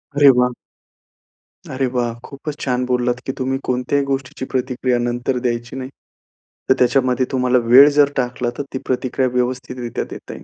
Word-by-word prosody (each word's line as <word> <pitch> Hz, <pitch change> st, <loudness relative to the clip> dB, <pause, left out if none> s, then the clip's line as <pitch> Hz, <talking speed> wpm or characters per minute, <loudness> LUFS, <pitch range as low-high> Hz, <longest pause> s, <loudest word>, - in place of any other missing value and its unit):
अरे 145 Hz, -1 st, +7 dB
वाह! 125 Hz, 0 st, +3 dB, 1.2 s
अरे 130 Hz, +1 st, -1 dB
वाह! 120 Hz, -2 st, 0 dB
खूपच 145 Hz, +1 st, -7 dB
छान 125 Hz, -1 st, 0 dB
बोललात 125 Hz, -1 st, 0 dB
की 135 Hz, -, -1 dB
तुम्ही 130 Hz, 0 st, -1 dB
कोणत्याही 125 Hz, +3 st, 0 dB
गोष्टीची 135 Hz, -1 st, -3 dB
प्रतिक्रिया 125 Hz, -1 st, 0 dB
नंतर 120 Hz, +2 st, -1 dB
द्यायची 120 Hz, 0 st, -2 dB
नाही. 130 Hz, 0 st, -5 dB, 0.8 s
तर -, -, +8 dB
त्याच्यामध्ये 125 Hz, 0 st, +2 dB
तुम्हाला 125 Hz, -1 st, +2 dB
वेळ 130 Hz, +5 st, +8 dB
जर 145 Hz, -1 st, +6 dB
टाकला, 125 Hz, -1 st, -1 dB
तर 145 Hz, -, -2 dB
ती 130 Hz, -, -1 dB
प्रतिक्रिया 130 Hz, 0 st, 0 dB
व्यवस्थितरित्या 125 Hz, -1 st, -2 dB
देता -, -, -8 dB
येईल. -, -, -11 dB
125 Hz, 155 wpm, -19 LUFS, 125-135 Hz, 1.2 s, तर